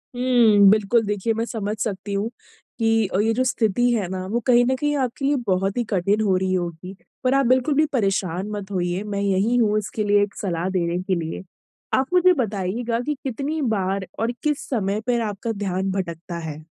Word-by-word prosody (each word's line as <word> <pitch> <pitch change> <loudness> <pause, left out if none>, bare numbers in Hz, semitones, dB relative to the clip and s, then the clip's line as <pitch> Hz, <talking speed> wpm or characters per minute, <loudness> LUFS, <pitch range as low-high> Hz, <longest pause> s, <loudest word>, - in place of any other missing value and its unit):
हम्म, 235 -5 +5
बिल्कुल 215 +2 +3
देखिए 205 +2 -1
मैं 225 +1 -2
समझ 215 -3 -3
सकती 205 -1 -3
हूँ 200 +3 -1 0.5
कि 225 -2 +2
अ, 185 - -1
ये 220 +2 +2
जो 255 +3 +1
स्थिति 245 -1 +1
है 205 -6 0
ना 185 -1 -4
वो 235 - +1
कहीं 245 -1 +5
न 260 - +1
कहीं 295 +2 -1
आपके 260 +1 -2
लिए 285 +1 +3
बहुत 195 +2 0
ही 240 - +1
कठिन 200 +2 +1
हो 195 -3 +2
रही 185 0 0
होगी। 175 +1 -4 0.3
पर 255 - +2
आप 275 -1 +3
बिल्कुल 255 +4 +3
भी 310 +2 +4
परेशान 195 -4 0
मत 205 -1 -6
होइए। 180 +1 -1
मैं 205 -1 -3
यँही 200 +4 +1
हूँ 215 -3 +3
इसके 210 +1 -4
लिए, 205 0 +3
एक 205 - -5
सलाह 180 -2 -2
देने 175 -2 -1
के 190 -1 0
लिए। 165 +2 -4 0.5
आप 265 +6 +1
मुझे 365 0 +6
बताइएगा 230 - -2
की 300 - 0
कितनी 280 +5 -3
बार 190 0 -2
और 230 +2 0
किस 295 -2 -1
समय 210 -4 -1
पर 240 -1 +2
आपका 210 +3 -4
ध्यान 195 -2 -2
भटकता 170 -2 -4
है? 155 +1 -8
210 Hz, 205 wpm, -23 LUFS, 190-240 Hz, 0.5 s, मुझे